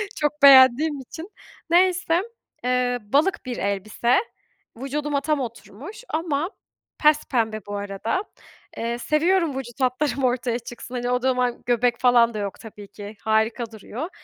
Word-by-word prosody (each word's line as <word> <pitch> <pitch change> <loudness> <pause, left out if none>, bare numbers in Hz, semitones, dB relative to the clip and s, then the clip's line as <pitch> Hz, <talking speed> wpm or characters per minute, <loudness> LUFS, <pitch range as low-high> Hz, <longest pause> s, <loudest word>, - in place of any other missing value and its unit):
Çok 295 -1 0
beğendiğim 275 +2 +7
için. 320 +8 -9 0.4
Neyse. 355 0 +3 0.4
Eee, 250 0 0
balık 285 - +1
bir 250 -1 -4
elbise. 200 +5 0 0.6
Vücuduma 280 +2 -2
tam 300 -1 0
oturmuş 255 - -8
ama 320 +1 -1 0.5
pespembe 235 -8 +2
bu 205 - -5
arada. 205 - -3 0.5
Eee, 235 +1 -2
seviyorum 315 +2 +1
vücut 255 0 -7
hatlarım 265 +2 0
ortaya 245 -1 0
çıksın. 240 +1 -9
Hani, 245 0 -2
o 250 0 +1
zaman 250 -1 0
göbek 240 0 +1
falan 240 -2 +4
da 215 - -4
yok 200 -1 -5
tabii 210 -2 -11
ki. 205 +1 -10
Harika 220 +2 0
duruyor. 225 - -7
250 Hz, 135 wpm, -23 LUFS, 230-295 Hz, 0.6 s, beğendiğim